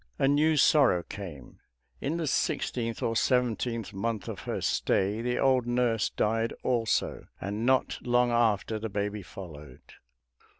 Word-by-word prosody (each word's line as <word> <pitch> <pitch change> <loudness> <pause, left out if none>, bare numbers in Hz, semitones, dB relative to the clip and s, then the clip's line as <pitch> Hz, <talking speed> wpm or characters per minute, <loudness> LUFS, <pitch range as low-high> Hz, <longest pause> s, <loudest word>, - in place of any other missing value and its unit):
A 135 - +2
new 150 +3 +3
sorrow 135 - +4
came; 85 -12 -9 0.4
in 150 +5 -2
the 165 - -2
sixteenth 115 -4 -1
or 115 - 0
seventeenth 115 -3 0
month 110 +2 -3
of - - -5
her - - -2
stay, 100 +3 0
the 125 +1 -1
old 130 -3 +2
nurse 120 -3 +1
died 115 +2 0
also, 120 -3 0
and 105 +5 -3
not 130 0 +2
long 120 0 +2
after 110 -2 +1
the 110 +1 -4
baby 105 +1 -2
followed. 75 -9 -11
115 Hz, 140 wpm, -28 LUFS, 105-125 Hz, 0.4 s, sorrow